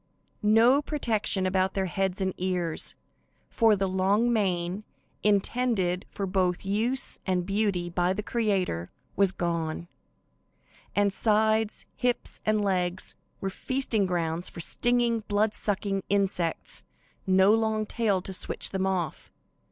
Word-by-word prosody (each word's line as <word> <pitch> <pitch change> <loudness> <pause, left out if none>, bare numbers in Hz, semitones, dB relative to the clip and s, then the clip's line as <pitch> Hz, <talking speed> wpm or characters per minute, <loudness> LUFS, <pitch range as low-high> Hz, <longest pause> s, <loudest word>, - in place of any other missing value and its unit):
No 225 +6 +5
protection 225 -10 -1
about 185 0 +1
their 195 -1 0
heads 190 +1 -1
and 190 -1 0
ears, 180 -3 -1 0.6
for 225 -2 +4
the 195 -1 0
long 200 +6 +2
mane, 185 -2 0 0.4
intended 205 -3 +1
for 200 - -4
both 185 -1 0
use 225 +7 +1
and 180 -2 +1
beauty 195 -3 0
by 175 +1 0
the 210 - -4
Creator, 195 - -1 0.3
was 195 -2 +4
gone, 170 -2 -2 1.1
and 200 -1 +3
sides, 220 0 +2
hips 245 -1 -2
and 215 -1 +2
legs 180 -1 -1 0.3
were 195 - -1
the - - -10
feasting 245 -7 0
ground 170 -1 -1
for - - -4
stinging, 240 +5 +1
blood 210 +1 +1
sucking 195 -1 -1
insects; 195 -4 0 0.5
no 190 +2 +5
long 220 -1 +1
tail 210 -4 0
to 190 - -6
switch - - -2
them 190 0 0
off. 180 -5 -2
195 Hz, 130 wpm, -27 LUFS, 185-215 Hz, 1.1 s, No